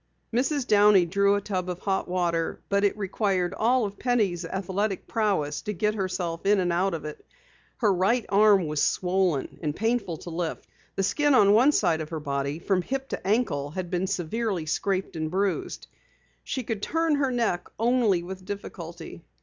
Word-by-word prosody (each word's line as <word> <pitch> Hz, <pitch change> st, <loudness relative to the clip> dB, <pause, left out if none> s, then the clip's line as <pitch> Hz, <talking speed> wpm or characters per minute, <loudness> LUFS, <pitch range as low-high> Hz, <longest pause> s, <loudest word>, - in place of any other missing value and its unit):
Mrs. 270 Hz, +3 st, +1 dB
Downey 205 Hz, -4 st, +5 dB
drew 200 Hz, +3 st, +2 dB
a 205 Hz, -, -1 dB
tub 185 Hz, -3 st, -3 dB
of 180 Hz, -, -3 dB
hot 195 Hz, -1 st, -1 dB
water, 170 Hz, -2 st, -1 dB
but 200 Hz, 0 st, +2 dB
it 205 Hz, +1 st, +2 dB
required 195 Hz, -2 st, -1 dB
all 240 Hz, +1 st, +2 dB
of 200 Hz, 0 st, -7 dB
Penny's 210 Hz, -9 st, +1 dB
athletic 190 Hz, +3 st, -2 dB
prowess 195 Hz, -10 st, 0 dB
to 210 Hz, -, -4 dB
get 210 Hz, +3 st, 0 dB
herself 185 Hz, -4 st, -3 dB
in 205 Hz, 0 st, +3 dB
and 175 Hz, -2 st, +1 dB
out 185 Hz, +1 st, +1 dB
of 155 Hz, -, -7 dB
it. 150 Hz, -, -8 dB, 0.5 s
Her 210 Hz, -5 st, +3 dB
right 205 Hz, +6 st, +1 dB
arm 200 Hz, -2 st, +5 dB
was 150 Hz, -1 st, -1 dB
swollen 180 Hz, -6 st, 0 dB
and 150 Hz, -2 st, -2 dB
painful 225 Hz, -6 st, -1 dB
to 170 Hz, -, -9 dB
lift. 165 Hz, 0 st, -3 dB, 0.3 s
The 195 Hz, -, 0 dB
skin 290 Hz, +7 st, +2 dB
on 200 Hz, -4 st, +6 dB
one 250 Hz, +7 st, +6 dB
side 170 Hz, -, +1 dB
of 155 Hz, -, -6 dB
her 160 Hz, -, -4 dB
body 140 Hz, 0 st, -2 dB
from 185 Hz, +2 st, 0 dB
hip 270 Hz, +7 st, -4 dB
to -, -, -5 dB
ankle 195 Hz, -, +1 dB
had 180 Hz, +3 st, -5 dB
been 180 Hz, +1 st, 0 dB
severely 195 Hz, 0 st, -2 dB
scraped 190 Hz, +4 st, -1 dB
and 155 Hz, -1 st, -2 dB
bruised. 195 Hz, +2 st, -2 dB, 0.6 s
She 260 Hz, -, -3 dB
could 220 Hz, -3 st, -4 dB
turn 325 Hz, +4 st, +1 dB
her 275 Hz, -2 st, +1 dB
neck 230 Hz, -8 st, -1 dB
only 225 Hz, -6 st, +2 dB
with 185 Hz, +1 st, -8 dB
difficulty. 170 Hz, -4 st, -8 dB
195 Hz, 180 wpm, -26 LUFS, 175-215 Hz, 0.6 s, on